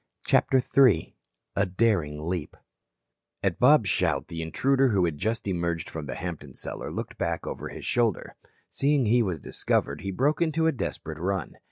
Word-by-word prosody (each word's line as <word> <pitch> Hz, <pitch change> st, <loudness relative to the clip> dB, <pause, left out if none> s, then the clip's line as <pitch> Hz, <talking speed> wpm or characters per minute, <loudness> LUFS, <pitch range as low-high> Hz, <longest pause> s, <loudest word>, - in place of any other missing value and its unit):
CHAPTER 130 Hz, -, +4 dB
III 130 Hz, -2 st, +3 dB, 0.4 s
A 100 Hz, 0 st, +2 dB
DARING 90 Hz, -7 st, 0 dB
LEAP 85 Hz, -4 st, -3 dB, 0.9 s
At -, -, 0 dB
Bob's 125 Hz, -4 st, +6 dB
shout -, -, 0 dB
the 85 Hz, -1 st, -4 dB
intruder 135 Hz, -, +2 dB
who 95 Hz, -5 st, +3 dB
had 75 Hz, -4 st, -3 dB
just 110 Hz, +2 st, -2 dB
emerged 85 Hz, -3 st, -2 dB
from 80 Hz, -2 st, -6 dB
the 65 Hz, -, -4 dB
Hampton 80 Hz, -6 st, -6 dB
cellar -, -, -6 dB
looked -, -, -6 dB
back -, -, -2 dB
over -, -, -5 dB
his -, -, -8 dB
shoulder. 115 Hz, -6 st, 0 dB, 0.3 s
Seeing 140 Hz, -2 st, +1 dB
he 120 Hz, +3 st, +4 dB
was 90 Hz, -8 st, -1 dB
discovered 70 Hz, +1 st, -1 dB
he 95 Hz, -, -4 dB
broke 140 Hz, -, +1 dB
into 160 Hz, -1 st, +1 dB
a 160 Hz, -, +4 dB
desperate 80 Hz, -, -5 dB
run. 95 Hz, -2 st, -2 dB
95 Hz, 170 wpm, -27 LUFS, 80-125 Hz, 0.9 s, Bob's